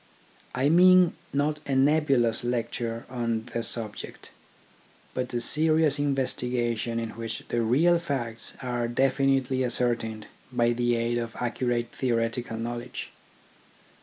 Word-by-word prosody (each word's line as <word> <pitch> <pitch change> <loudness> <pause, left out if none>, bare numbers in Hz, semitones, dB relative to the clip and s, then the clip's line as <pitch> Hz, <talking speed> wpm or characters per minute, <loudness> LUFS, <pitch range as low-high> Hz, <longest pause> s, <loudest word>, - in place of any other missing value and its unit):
I 130 +2 +2
mean 180 +2 +6 0.2
not 150 +2 0
a 135 - 0
nebulous 135 -5 +2
lecture 120 -1 -3
on 115 -3 -2
the 115 - -1
subject, 110 -2 -2 0.8
but 125 -1 -3
a 120 - -1
serious 155 +3 +3
investigation 125 -4 -1
in 115 -1 -2
which 115 -1 -6
the 120 - 0
real 155 +10 +3
facts 125 -8 -3
are 120 -1 -1
definitely 135 +1 +1
ascertained 115 -3 -1 0.3
by 120 -1 +2
the 120 0 +1
aid 115 +1 0
of 115 -1 -5
accurate 120 -1 -1
theoretical 115 -2 -1
knowledge. 120 +2 -5
120 Hz, 120 wpm, -27 LUFS, 115-135 Hz, 0.8 s, mean